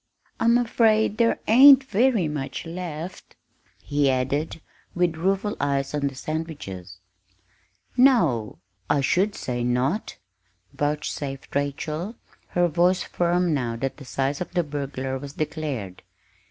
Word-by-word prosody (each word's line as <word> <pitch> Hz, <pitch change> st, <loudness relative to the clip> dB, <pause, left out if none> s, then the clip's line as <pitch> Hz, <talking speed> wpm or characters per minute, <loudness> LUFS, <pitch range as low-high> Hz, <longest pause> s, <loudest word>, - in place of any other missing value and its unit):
I'm 235 Hz, +1 st, +4 dB
afraid 220 Hz, -2 st, +2 dB
there 230 Hz, -1 st, +3 dB
ain't 270 Hz, +4 st, +8 dB
very 235 Hz, -, +2 dB
much 150 Hz, 0 st, -4 dB
left," 170 Hz, 0 st, -7 dB, 0.5 s
he 145 Hz, -1 st, +1 dB
added, 135 Hz, +5 st, -1 dB, 0.4 s
with 175 Hz, -2 st, +1 dB
rueful 195 Hz, +5 st, 0 dB
eyes 140 Hz, -1 st, -1 dB
on 145 Hz, -1 st, 0 dB
the 135 Hz, -, -6 dB
sandwiches. 135 Hz, -, -6 dB, 1.0 s
"No, 170 Hz, -, +3 dB, 0.3 s
I 145 Hz, -, +3 dB
should 190 Hz, +9 st, +1 dB
say 120 Hz, -1 st, -3 dB
not!" 125 Hz, -, -1 dB, 0.6 s
vouchsafed 145 Hz, -2 st, -3 dB
Rachel, 155 Hz, -, -2 dB, 0.3 s
her 175 Hz, 0 st, +2 dB
voice 175 Hz, +3 st, +2 dB
firm 175 Hz, -1 st, +1 dB
now 120 Hz, -5 st, -1 dB
that 135 Hz, +3 st, -3 dB
the 140 Hz, -, -11 dB
size 135 Hz, +3 st, -2 dB
of 180 Hz, -, -4 dB
the 175 Hz, -1 st, +2 dB
"burglar" 135 Hz, -3 st, -4 dB
was 140 Hz, +1 st, -8 dB
declared. 145 Hz, -, -4 dB
155 Hz, 125 wpm, -24 LUFS, 135-185 Hz, 1.0 s, ain't